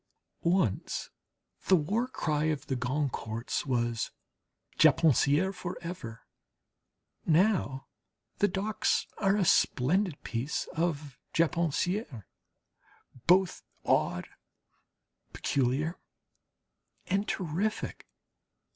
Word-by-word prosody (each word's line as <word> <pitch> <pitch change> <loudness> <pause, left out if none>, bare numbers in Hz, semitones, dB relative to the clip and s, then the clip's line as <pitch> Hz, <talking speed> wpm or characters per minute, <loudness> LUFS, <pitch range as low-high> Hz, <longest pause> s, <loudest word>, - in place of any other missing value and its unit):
Once 170 - 0 0.6
the 190 - +7
war 205 +10 0
cry 155 -11 -1
of 155 -3 -1
the 135 - -2
Goncourts 125 -2 -2
was, 120 -3 0 0.7
"Japonaiserie 165 +3 +4
for 180 -1 -5
ever." 140 -10 -7 1.0
Now 165 -6 +2 0.5
the 205 - +5
docks 200 +2 0
are 195 -1 +3
a 200 -3 +2
splendid 170 +5 +2
piece 125 +6 -2
of 155 -4 -2 0.2
Japonaiserie, 165 - 0 1.0
both 180 0 +4 0.2
odd, 90 - +1 1.1
peculiar, 140 +6 0 1.1
and 200 +2 0
terrific. 190 +5 -2
160 Hz, 80 wpm, -30 LUFS, 135-190 Hz, 1.1 s, the